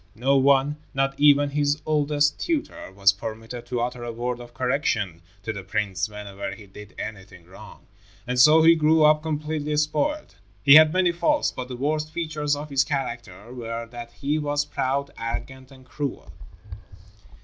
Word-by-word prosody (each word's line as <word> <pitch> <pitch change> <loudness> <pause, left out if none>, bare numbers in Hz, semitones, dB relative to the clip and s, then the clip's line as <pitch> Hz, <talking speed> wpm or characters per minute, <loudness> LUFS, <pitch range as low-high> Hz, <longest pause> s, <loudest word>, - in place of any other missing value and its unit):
No 130 +5 +1
one, 140 +2 +3 0.2
not 135 0 +1
even 145 -1 +5
his 145 +1 0
oldest 145 -1 +1
tutor, 315 - -3
was 100 +1 +3
permitted 115 +3 -8
to 120 -1 -2
utter 120 0 -3
a 120 - -4
word 120 +1 -4
of 120 0 -11
correction 115 - -1 0.2
to 110 - -3
the 100 - -6
prince 100 +1 -2
whenever 100 -1 -7
he 105 - -13
did 100 +1 -13
anything 95 -5 -8
wrong, 95 +2 -14 0.4
and 125 +1 -2
so 155 +5 +7
he 165 +1 +8
grew 155 -1 +4
up 150 0 +5
completely 150 -1 -3
spoiled. 290 - -1 0.3
He 140 - +7
had 155 0 +8
many 185 0 +2
faults, 295 - +1
but 125 - -6
the 125 -1 -7
worst 150 +3 -1
features 155 -3 -2
of 145 +1 -8
his 135 0 +3
character 120 - -5
were 115 -1 -5
that 120 -1 -9
he 145 +2 -2
was 145 0 -1
proud, 140 0 -2
arrogant 130 +3 -6
and 130 -2 -16
cruel. 130 - -5
135 Hz, 170 wpm, -24 LUFS, 115-150 Hz, 0.4 s, he